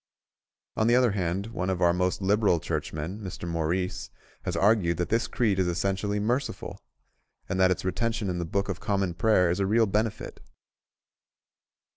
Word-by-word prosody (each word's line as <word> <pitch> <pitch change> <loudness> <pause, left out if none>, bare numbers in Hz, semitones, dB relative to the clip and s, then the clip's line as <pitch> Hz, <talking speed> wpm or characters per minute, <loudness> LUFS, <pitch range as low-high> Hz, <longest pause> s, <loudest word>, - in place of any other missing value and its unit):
On 110 - +1
the 120 - +5
other 125 -2 +4
hand 95 0 -1
one 95 -4 -2
of 95 -2 -1
our 85 -1 +4
most 90 +2 -1
liberal 100 -3 +3
Churchmen, 80 +6 -4
Mr. 95 -3 -6
Maurice, 85 +2 -2 0.4
has - - -2
argued 95 -5 +3
that 90 0 -2
this 115 +2 +1
creed 110 -7 0
is 95 - +2
essentially 95 +4 -1
merciful, 120 +6 -2 0.7
and 95 0 -2
that 95 0 +5
its 90 - -1
retention 110 +3 -1
in 90 -1 -2
the 85 - -2
Book 100 +4 -1
of 95 -2 -3
Common 95 -3 -1
Prayer 90 -1 +3
is 90 - -1
a 100 - +1
real 115 +3 +4
benefit. 110 +2 -2
95 Hz, 170 wpm, -27 LUFS, 90-105 Hz, 0.7 s, the